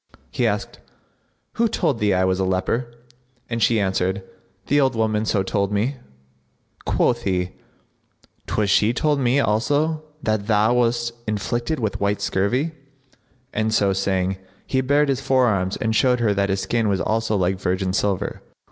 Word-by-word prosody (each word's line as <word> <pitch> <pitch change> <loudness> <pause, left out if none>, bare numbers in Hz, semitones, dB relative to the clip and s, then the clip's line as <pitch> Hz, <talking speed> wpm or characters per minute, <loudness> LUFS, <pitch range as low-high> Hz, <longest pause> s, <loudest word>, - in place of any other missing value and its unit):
He - - +1
asked, - - -3 0.8
"Who 230 0 +3
told 165 - 0
thee 105 -1 +2
I 95 0 +2
was 95 0 +1
a - - +1
leper?" 95 +6 -1 0.6
and 115 0 -2
she 115 +1 +3
answered, 95 0 0 0.4
"The 145 +1 +3
old 130 -3 +2
woman 110 -1 0
so 100 -3 +1
told 100 0 -1
me." 115 +7 0 0.9
Quoth 120 -1 +1
he, 90 -4 -1 1.0
"'Twas 105 -2 0
she 105 +3 +3
told 145 +3 +1
me 130 +1 +2
also 145 +7 +1 0.2
that 110 -2 -1
thou 110 +1 +3
wast 120 -1 +1 0.2
afflicted 120 - -2
with 110 -4 -2
white 100 0 +1
scurvy;" 125 +12 0 0.8
and 110 +1 0
so 100 -3 +2
saying, 95 -1 0 0.3
he 130 - 0
bared 145 +3 +2
his 135 -1 0
forearms 105 -8 +1
and 110 0 -1
showed 125 +1 +3
her 110 -3 +2
that 100 0 0
his 95 0 0
skin 115 -3 0
was 95 -2 +1
also 110 -1 0
like 95 0 0
virgin 95 -1 -1
silver. 100 -1 -1
110 Hz, 160 wpm, -22 LUFS, 100-125 Hz, 1.0 s, Who